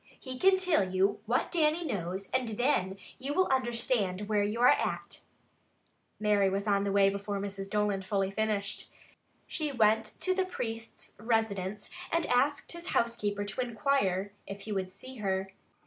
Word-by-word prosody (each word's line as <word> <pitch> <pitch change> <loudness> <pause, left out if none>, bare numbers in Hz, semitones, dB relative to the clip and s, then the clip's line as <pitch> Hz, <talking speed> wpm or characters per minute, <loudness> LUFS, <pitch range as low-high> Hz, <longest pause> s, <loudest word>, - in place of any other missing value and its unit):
He 255 -1 -7
can 385 0 +6
till 365 - +3
you 195 +2 +2
what 245 +3 +1
Dannie 325 0 +2
knows 190 - -3
and 255 -2 +1
thin 210 -5 +1 0.2
you 280 +2 -3
will 370 - +4
understand 235 -6 +1
where 210 0 +1
you 210 +3 -1
are 245 - +6
at." - - +1 1.0
Mary 205 -2 +3
was 195 +1 -1
on 200 -1 +2
the 200 - 0
way 195 0 +5
before 200 0 -3
Mrs. 195 -1 -5
Dolan 210 -2 +1
fully 195 0 0
finished. 210 -1 -2 0.5
She 305 -2 -2
went 220 -3 +3
to 370 - +3
the 380 0 +1
priest's 225 -11 -5
residence 210 -3 -1 0.2
and 335 -1 +2
asked 275 +4 +2
his 340 +1 -6
housekeeper 210 -3 0
to 205 +5 -3
inquire 210 -5 0
if 200 0 -7
he 215 - -7
would 190 -2 -2
see 255 +7 -10
her. 195 -2 -2
210 Hz, 165 wpm, -30 LUFS, 195-255 Hz, 1.0 s, can